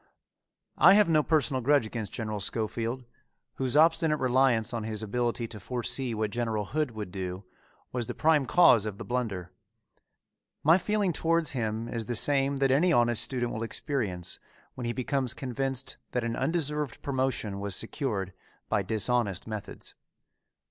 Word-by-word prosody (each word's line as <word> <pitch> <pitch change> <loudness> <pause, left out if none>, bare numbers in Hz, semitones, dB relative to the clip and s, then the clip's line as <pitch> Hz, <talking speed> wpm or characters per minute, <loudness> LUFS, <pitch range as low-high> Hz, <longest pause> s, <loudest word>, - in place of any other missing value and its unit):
I 190 - +8
have 210 -3 +5
no 155 -2 +4
personal 145 -4 +1
grudge 140 0 +3
against 110 -1 -5
General 110 -2 -4
Schofield, 115 +5 -2 0.5
whose 130 +1 0
obstinate 160 -1 +4
reliance 125 -3 +2
on 115 -2 -2
his 110 0 -4
ability 120 +2 -1
to 110 - -8
foresee 125 +3 -1
what 110 -1 -1
General 115 -3 -1
Hood 150 +6 -1
would 110 -5 -7
do, 95 0 -5 0.5
was 120 -3 -2
the - - -4
prime 155 -4 +3
cause 120 - +5
of 100 -2 -5
the - - -7
blunder. 110 -8 -3 1.1
My 160 +5 +6
feeling 205 -3 0
towards 165 -2 +1
him 115 -2 -2
is 115 -2 -4
the 120 - -2
same 140 +2 +3
that 135 -1 +2
any 165 +7 +4
honest 120 -6 +3
student 120 -2 -1
will 110 - -4
experience 115 - -3 0.3
when 125 - -6
he 120 - 0
becomes 130 0 -1
convinced 135 0 -2 0.2
that 125 - 0
an 115 0 -2
undeserved 150 -5 -2
promotion 130 -7 -1
was 100 -2 -3
secured 105 -6 -3 0.4
by 110 -2 +2
dishonest 110 0 0
methods. 110 -2 -7
120 Hz, 155 wpm, -28 LUFS, 110-140 Hz, 1.1 s, I